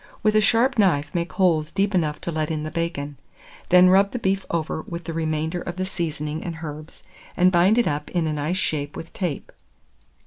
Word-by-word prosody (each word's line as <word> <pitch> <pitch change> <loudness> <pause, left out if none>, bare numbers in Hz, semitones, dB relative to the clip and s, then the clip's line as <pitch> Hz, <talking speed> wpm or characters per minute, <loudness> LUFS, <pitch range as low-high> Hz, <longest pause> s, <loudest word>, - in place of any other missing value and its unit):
With 215 0 +3
a 215 - +6
sharp 235 +4 +3
knife 150 -8 +2
make 170 0 -2
holes 165 -5 +2
deep 200 +3 0
enough 155 -5 0
to 170 - -3
let 155 -1 -1
in 155 -2 -2
the 155 - -5
bacon; 145 -4 -3 0.5
then 180 0 +7
rub 195 +2 +4
the - - -1
beef 195 -3 -1
over 160 -1 -2
with 170 +1 -7
the 165 0 -5
remainder 160 +1 -2
of 175 - -5
the 185 0 -2
seasoning 155 -4 -3
and 170 -2 -5
herbs, 155 +1 -8 0.3
and 180 +1 +5
bind 185 +5 +4
it 240 - +3
up 150 0 -2
in 175 -2 0
a 155 - -1
nice 150 +5 -1
shape 145 -5 -2
with 165 - -9
tape. 175 -7 -4
170 Hz, 210 wpm, -23 LUFS, 155-185 Hz, 0.5 s, then